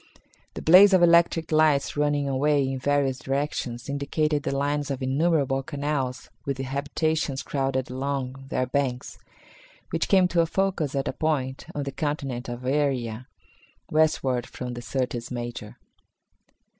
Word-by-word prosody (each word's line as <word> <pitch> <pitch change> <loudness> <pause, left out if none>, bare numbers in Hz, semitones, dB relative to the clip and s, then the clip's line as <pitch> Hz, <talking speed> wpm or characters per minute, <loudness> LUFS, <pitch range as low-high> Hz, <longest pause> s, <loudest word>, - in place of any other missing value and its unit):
The - - -6
blaze 190 +5 +8
of 185 -2 +5
electric 170 -1 +4
lights 155 -2 +3
running 145 -1 +1
away 140 +1 +2
in 135 0 -3
various 140 -1 +1
directions 135 -3 -3
indicated 145 +2 0
the 140 -1 -2
lines 145 +1 -1
of 135 -1 -3
innumerable 135 -1 +1
canals 140 -2 -3
with 140 -1 -3
habitations 140 +2 -1
crowded 135 -2 -2
along 135 0 -3
their 130 - 0
banks, 130 -1 -2 0.7
which - - 0
came 190 -2 +5
to 170 -1 +3
a 165 - +1
focus 180 -6 -1
at 135 - -1
a - - -1
point 140 -4 -2
on 145 - -2
the 140 - -4
continent 135 -5 -3
of 120 +1 -6
Aeria, 130 -4 -1 0.6
westward 135 -6 +2
from 125 -1 -6
the 120 - -6
Syrtis 125 -1 -3
Major. 120 -3 -6
140 Hz, 145 wpm, -25 LUFS, 130-150 Hz, 0.7 s, blaze